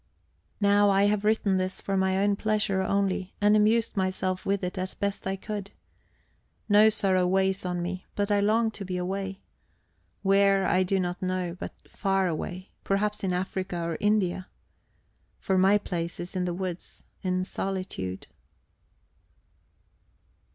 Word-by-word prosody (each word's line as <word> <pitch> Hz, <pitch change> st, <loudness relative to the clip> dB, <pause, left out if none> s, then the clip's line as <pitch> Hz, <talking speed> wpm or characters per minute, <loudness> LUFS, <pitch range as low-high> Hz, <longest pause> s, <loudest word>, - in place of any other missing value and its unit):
Now 205 Hz, 0 st, +4 dB
I 195 Hz, 0 st, +4 dB
have 205 Hz, 0 st, +2 dB
written 210 Hz, -2 st, +2 dB
this 185 Hz, 0 st, -1 dB
for 195 Hz, -, -2 dB
my 190 Hz, 0 st, +2 dB
own 200 Hz, +1 st, +2 dB
pleasure 205 Hz, -2 st, 0 dB
only, 195 Hz, -1 st, -1 dB
and 205 Hz, +1 st, +4 dB
amused 220 Hz, +2 st, +3 dB
myself 185 Hz, -1 st, -1 dB
with 195 Hz, -1 st, 0 dB
it 180 Hz, 0 st, -2 dB
as 185 Hz, +1 st, -3 dB
best 200 Hz, -1 st, -2 dB
I 190 Hz, -, 0 dB
could. 205 Hz, 0 st, -5 dB, 1.0 s
No 210 Hz, +1 st, +6 dB
sorrow 190 Hz, -4 st, +1 dB
weighs 190 Hz, 0 st, +1 dB
on 175 Hz, -1 st, -2 dB
me, 185 Hz, +1 st, -5 dB
but 205 Hz, 0 st, 0 dB
I 205 Hz, -, +4 dB
long 220 Hz, +2 st, +2 dB
to 205 Hz, -, -7 dB
be 185 Hz, -1 st, -3 dB
away 195 Hz, +2 st, -3 dB, 0.8 s
where, 195 Hz, 0 st, +4 dB
I 185 Hz, -, +3 dB
do 190 Hz, +1 st, +1 dB
not 180 Hz, +1 st, -2 dB
know, 185 Hz, -2 st, -2 dB
but -, -, -6 dB
far 195 Hz, -2 st, 0 dB
away, 180 Hz, +3 st, -4 dB
perhaps 205 Hz, +1 st, 0 dB
in 190 Hz, -, 0 dB
Africa 185 Hz, 0 st, -2 dB
or 165 Hz, -1 st, -2 dB
India. 195 Hz, -3 st, +1 dB, 0.9 s
For 190 Hz, -, -1 dB
my 190 Hz, +2 st, +5 dB
place 170 Hz, -4 st, -4 dB
is 175 Hz, +2 st, -5 dB
in 180 Hz, -1 st, 0 dB
the 175 Hz, -, -1 dB
woods, 185 Hz, -1 st, -5 dB, 0.2 s
in 185 Hz, -1 st, 0 dB
solitude... 185 Hz, -, -4 dB
190 Hz, 150 wpm, -27 LUFS, 185-200 Hz, 1.0 s, No